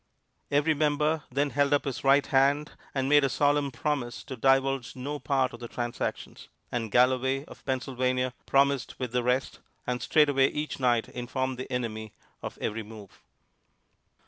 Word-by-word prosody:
Every 145 +3 +3
member 150 +1 +1
then 140 +2 0
held 140 0 +2
up 145 - +2
his 135 -3 -4
right 140 +1 +5
hand 140 +2 +2 0.2
and 135 -1 0
made 145 0 +5
a 135 - +2
solemn 145 +1 +2
promise 125 -1 -3
to 130 - -7
divulge 135 -1 +1
no 145 +3 -4
part 135 -3 0
of 120 - -9
the 120 - -7
transactions; 120 0 -5 0.2
and 115 -2 -2
Galloway, 130 +3 +2
of - - -14
Pennsylvania, 130 -1 -1
promised 140 -1 +2
with 125 -3 -4
the 125 0 +1
rest, 125 +2 -1 0.3
and 125 0 -2
straightway 145 -3 +4
each 150 0 -4
night 120 -3 +2
informed 130 +1 -3
the 130 - -6
enemy 110 -3 -3 0.3
of - - -6
every 115 +2 -2
move. 105 -2 -12
135 Hz, 160 wpm, -28 LUFS, 125-140 Hz, 0.3 s, right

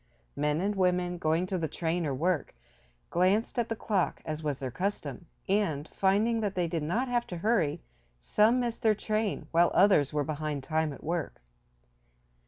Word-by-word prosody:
Men 150 +2 0
and 205 +2 0
women, 180 -2 +1
going 160 +3 +1
to 185 0 -2
the 160 - -1
train 165 +1 -1
or 135 - -1
work, 160 - -1 0.6
glanced 195 +7 +2
at 235 - 0
the 225 - -1
clock, 205 -5 -1
as 155 0 -4
was 150 -3 -2
their 130 -2 -4
custom, 170 -4 -3 0.2
and, 165 -7 0
finding 210 +4 +2
that 205 -3 -2
they 175 -2 +1
did 165 -1 -2
not 215 - 0
have 240 -1 0
to 175 - -5
hurry 170 - +1 0.4
some 215 - +3
missed 240 -1 -2
their 220 -3 +4
train, 215 -4 -1
while 170 +1 +4
others 185 -8 +5
were 150 -1 0
behind 150 -2 -3
time 155 +1 0
at 140 - -10
work. 160 - -3
175 Hz, 180 wpm, -29 LUFS, 155-205 Hz, 0.6 s, others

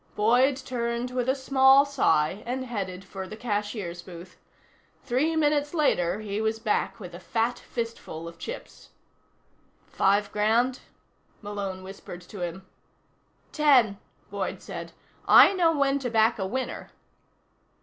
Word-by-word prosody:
Boyd 250 +6 +3
turned 240 -2 -3
with 250 0 -1
a 265 - +3
small 270 0 +5
sigh 185 - +1
and 260 +1 -3
headed 195 -6 -5
for 190 0 -7
the 215 - -9
cashier's 205 -6 -3
booth. 175 0 -12 0.6
Three 280 +6 0
minutes 295 0 +1
later, 195 - +1
he 210 0 -3
was 220 0 0
back 220 +1 -1
with 180 -4 -9
a 175 - -8
fat 230 +5 -1
fistful 230 -8 -6
of 170 - -11
chips. 485 - -8 1.0
"Five 200 +1 +1
grand?" 230 +5 +1 0.6
Malone 200 -2 -5
whispered 190 -2 -9
to 185 +3 -11
him. 175 +2 -5 0.9
"Ten," 255 -10 +4 0.3
Boyd - - -3
said. - - -7 0.4
"I - - +8
know 345 -3 +3
when 280 -2 +1
to 255 -2 -3
back 225 0 +3
a 190 - -1
winner." 260 +5 -4
225 Hz, 135 wpm, -26 LUFS, 195-260 Hz, 1.0 s, I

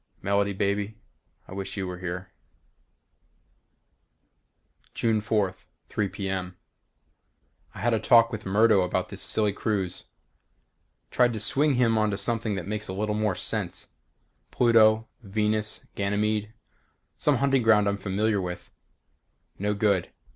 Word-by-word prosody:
Melody 100 +1 +1
baby 100 +2 -1 0.5
I - - -10
wish 95 +1 -5
you 95 - -2
were 90 -1 -6
here 90 +1 -5 2.6
June 110 -2 +1
4th, 105 -4 0 0.3
3:00 100 -3 -1
p. 100 - -4
m. 90 -2 -4 1.2
I - - -8
had 120 0 +2
a 110 - +2
talk 115 +1 +5
with 110 -2 -5
Murdo 105 +1 +4
about 90 0 -1
this - - -6
silly 105 -2 +1
cruise. 100 -4 -2 1.1
Tried 125 -1 +3
to 110 - -4
swing 140 +6 +2
him 115 -3 +3
onto 105 -2 +1
something 110 +1 0
that 90 -3 -4
makes 105 +1 -4
a 95 - -4
little 105 +2 -1
more 105 -2 0
sense. - - -3 0.6
Pluto, 110 -2 +4
Venus, 105 0 -1
Ganymede 105 +1 -1 0.7
some - - +3
hunting 135 -1 +2
ground 110 -2 +4
I'm 100 0 0
familiar 100 +2 0
with. 90 -1 -6 0.9
No 105 +1 0
good. 100 -4 +1
105 Hz, 135 wpm, -26 LUFS, 100-110 Hz, 2.6 s, talk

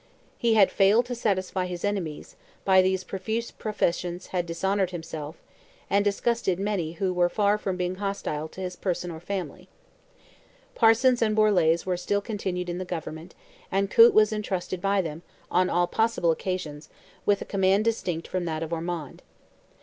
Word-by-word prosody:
He 230 -2 +3
had 200 -3 +5
failed 210 +5 +4
to 245 - -4
satisfy 190 -5 -1
his 180 0 -4
enemies, 185 -7 -3 0.3
by 190 -1 +6
these 185 0 +1
profuse 220 +5 -3
professions 180 -4 -2
had 175 -1 0
dishonoured 190 +3 0
himself, 160 -3 -6 0.6
and 200 0 +4
disgusted 205 -2 0
many 195 -6 -1
who 185 +2 -1
were 175 0 +2
far 205 +2 +2
from 190 -3 -2
being 180 0 -2
hostile 195 -6 -3
to 185 - -10
his 180 -1 -4
person 180 -1 -3
or 160 - -7
family. 190 +2 -5 1.0
Parsons 245 - +4
and 215 -2 +2
Borlase 180 -7 +3
were 180 -1 0
still 200 +3 0
continued 195 -4 -3
in 175 +1 -3
the - - -2
government, 160 -1 -6 0.4
and 195 0 0
Coote 230 +1 +7
was 215 0 +5
entrusted 190 -4 -3
by 195 0 +2
them, 160 0 -6 0.3
on 185 0 +3
all 175 +1 +2
possible 220 -3 +1
occasions, 160 -4 -4 0.4
with 205 -1 +4
a - - -15
command 195 +1 +2
distinct 180 -7 -1
from 185 -1 -2
that 160 -1 -2
of 165 +1 -5
Ormond. 165 -3 -4
185 Hz, 165 wpm, -26 LUFS, 175-205 Hz, 1.0 s, Coote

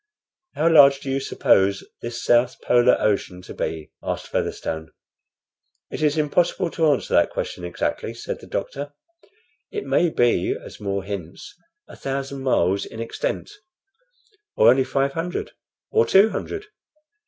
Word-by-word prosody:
"How 160 - +2
large 140 -4 +7
do 135 - -4
you 135 - 0
suppose 100 -7 +2 0.2
this 120 0 -5
south 120 +1 +3
polar 120 0 +4
ocean 95 -3 -1
to - - -9
be?" 80 -2 -4
asked - - -4
Featherstone. 80 0 -3 1.0
"It - - -5
is 150 0 +2
impossible 170 +3 +1
to 160 -1 +1
answer 140 -4 0
that - - +4
question 90 - -5
exactly," 90 0 -3
said - - -5
the - - -13
doctor. 145 +1 -4 0.8
"It 420 -1 -5
may 175 - +2
be, 120 -6 +1
as - - -12
More 100 -1 -2
hints, 95 -4 -7 0.3
a - - -12
thousand 135 0 -4
miles 100 -7 +2
in 115 - -9
extent, 115 - -3 1.0
or 115 +2 +7
only 130 +1 +3
five 135 +1 0
hundred, 165 +4 -4 0.4
or 450 +1 +3
two 205 +3 +6
hundred. 410 0 -5
135 Hz, 145 wpm, -23 LUFS, 100-150 Hz, 1.0 s, large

